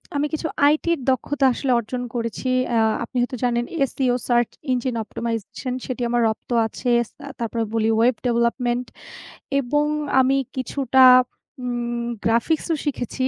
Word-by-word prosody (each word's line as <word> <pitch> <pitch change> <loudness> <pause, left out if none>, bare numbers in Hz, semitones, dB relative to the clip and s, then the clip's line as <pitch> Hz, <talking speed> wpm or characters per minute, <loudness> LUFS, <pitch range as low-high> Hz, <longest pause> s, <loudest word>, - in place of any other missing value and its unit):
আমি 285 - +1
কিছু 315 +1 -1 0.2
আইটির 310 +2 +2
দক্ষতা 270 +2 0
আসলে 260 +1 -1
অর্জন 245 +3 -4
করেছি। 230 +2 -3 0.3
আ - - +3 0.3
আপনি 240 +2 -6
হয়তো 250 +1 -2
জানেন 240 -1 +1
আ - - -3
SEO 255 -2 +1
সার্চ 240 -1 +2 0.2
ইঞ্জিন 250 -1 -1
অপটিমাইজেশন 230 +3 -4
সেটি 255 -2 -5
আমার 240 0 +1
রপ্ত 220 - -6 0.2
আছে। 235 +3 -4
এস 235 - -5 0.2
আ - - -7
তারপরে 230 0 -2
বলি 225 -1 +1
ওয়েব 240 +2 +3
ডেভেলপমেন্ট 240 +1 +1 0.7
এবং 295 +3 +1 0.3
আমি 265 +1 +3 0.2
কিছুটা 260 0 +3 0.6
উম 240 -1 -2 0.3
গ্রাফিক্স 235 +8 +1
ও - - +1
শিখেছি 260 -2 -2
245 Hz, 150 wpm, -22 LUFS, 235-265 Hz, 0.7 s, আ